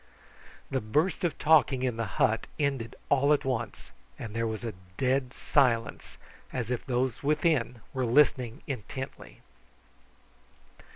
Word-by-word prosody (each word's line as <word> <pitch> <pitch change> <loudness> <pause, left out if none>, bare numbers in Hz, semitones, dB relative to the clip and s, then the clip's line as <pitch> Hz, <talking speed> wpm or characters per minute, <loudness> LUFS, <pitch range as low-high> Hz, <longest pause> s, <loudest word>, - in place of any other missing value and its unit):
The 135 - 0
burst 150 - 0
of 175 - 0
talking 145 -4 +4
in 125 -3 0
the 115 -1 -2
hut 110 +1 +2
ended 140 -6 -1
all 145 +1 +4
at 145 - 0
once, 120 -3 -3 0.3
and 110 -2 -7
there 115 0 0
was 110 +1 -4
a 115 -2 -3 0.2
dead 130 -1 +1
silence, 125 -6 +1 0.3
as 125 -2 -3
if 125 - -1
those 125 -2 -1
within 145 -5 +1
were 130 -2 0
listening 125 -2 +3
intently. 130 0 -7
130 Hz, 130 wpm, -29 LUFS, 115-140 Hz, 0.3 s, talking